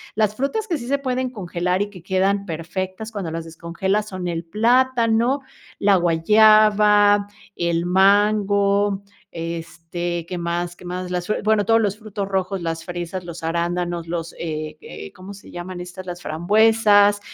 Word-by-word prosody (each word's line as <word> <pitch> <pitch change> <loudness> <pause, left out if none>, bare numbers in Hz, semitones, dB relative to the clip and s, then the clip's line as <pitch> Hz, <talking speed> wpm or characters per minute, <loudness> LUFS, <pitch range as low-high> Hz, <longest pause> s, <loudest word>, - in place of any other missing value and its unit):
Las 215 -1 +1
frutas 280 - -2
que 340 -5 -1
sí 240 - -8
se 280 +2 +1
pueden 255 -2 -2
congelar 180 -4 -2
y 205 - -1
que 185 -4 -13
quedan 195 +2 +1
perfectas 185 +5 -5
cuando 190 -6 -4
las 165 0 -5
descongelas 190 +6 -2
son 185 -2 -5
el 170 -1 -3
plátano, 235 +5 +2 0.4
la 200 -1 +4
guayaba, 205 +3 +5 0.3
el 170 0 0
mango, 200 +1 +3 0.3
este, 170 +1 -5
¿qué 180 - -4
más? 170 0 -3
¿Qué - - -14
más? 180 0 -5
Las 180 -1 -2
fre 215 - -1
bueno, 215 -1 +2
todos 225 0 +4
los 205 -1 -1
frutos 210 -2 -5
rojos, 190 -1 -2
las 165 -1 -4
fresas, 175 0 -5
los 170 -1 -8
arándanos, 170 +1 -2
los, 165 -1 -4
eh 155 -2 -4
eh, 75 - -10
¿cómo 190 +2 -10
se 200 - -14
llaman 175 0 -7
estas? 180 +1 -9
Las 175 -1 -7
frambuesas. 205 +4 +4
190 Hz, 160 wpm, -21 LUFS, 170-210 Hz, 0.4 s, guayaba